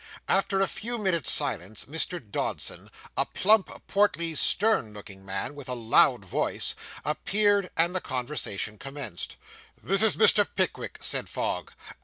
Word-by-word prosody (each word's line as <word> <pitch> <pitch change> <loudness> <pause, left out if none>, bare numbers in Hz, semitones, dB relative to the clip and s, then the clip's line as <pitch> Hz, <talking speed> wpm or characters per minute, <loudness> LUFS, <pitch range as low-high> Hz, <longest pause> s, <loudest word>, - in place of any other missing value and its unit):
After 195 0 +1
a 195 - +3
few 240 +2 -4
minutes' 190 -7 +1
silence, 110 -8 +2
Mr. 160 +4 -2
Dodson, 105 -5 -4 0.3
a - - +3
plump, 210 0 +2 0.2
portly, 170 -5 0
stern 185 - +3
looking 100 -2 -12
man, 95 +7 -4
with 140 -3 -10
a 125 - -2
loud 115 -1 +3
voice, - - 0 0.3
appeared; 200 +5 +1
and 170 +2 +2
the 185 - -1
conversation 125 -6 -3
commenced. 135 -10 -6 0.5
'This 195 +2 +2
is 220 - +5
Mr. 455 - +5
Pickwick,' - - -2
said - - +1
Fogg. - - -4
160 Hz, 140 wpm, -26 LUFS, 120-195 Hz, 0.5 s, is